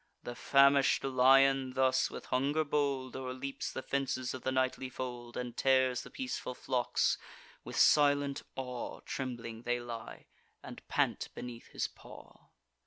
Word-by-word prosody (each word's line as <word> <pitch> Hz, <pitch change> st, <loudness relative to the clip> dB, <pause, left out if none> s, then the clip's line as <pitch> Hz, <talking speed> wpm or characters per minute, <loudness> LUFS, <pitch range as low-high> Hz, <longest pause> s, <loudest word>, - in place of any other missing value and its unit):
The 120 Hz, -, -5 dB
famish'd 140 Hz, +2 st, +4 dB
lion 135 Hz, 0 st, +4 dB
thus, 130 Hz, 0 st, +2 dB
with -, -, -8 dB
hunger 140 Hz, +5 st, +1 dB
bold, 140 Hz, -3 st, -1 dB
O'erleaps 130 Hz, +1 st, -4 dB
the 130 Hz, -, -5 dB
fences 135 Hz, -2 st, -2 dB
of 130 Hz, -, -6 dB
the 130 Hz, -, -1 dB
nightly 130 Hz, 0 st, 0 dB
fold, 120 Hz, -2 st, -6 dB
And 125 Hz, -2 st, -4 dB
tears 130 Hz, -2 st, +3 dB
the -, -, -11 dB
peaceful 255 Hz, -, -4 dB
flocks: 125 Hz, -1 st, 0 dB, 0.4 s
with -, -, -8 dB
silent 145 Hz, -1 st, +4 dB
awe 125 Hz, -2 st, -5 dB
Trembling 120 Hz, -4 st, -5 dB
they 120 Hz, 0 st, -1 dB
lie, 115 Hz, -2 st, -8 dB, 0.4 s
and -, -, -9 dB
pant -, -, 0 dB
beneath 120 Hz, -1 st, -8 dB
his -, -, -2 dB
paw. -, -, -15 dB
130 Hz, 140 wpm, -32 LUFS, 125-135 Hz, 0.4 s, famish'd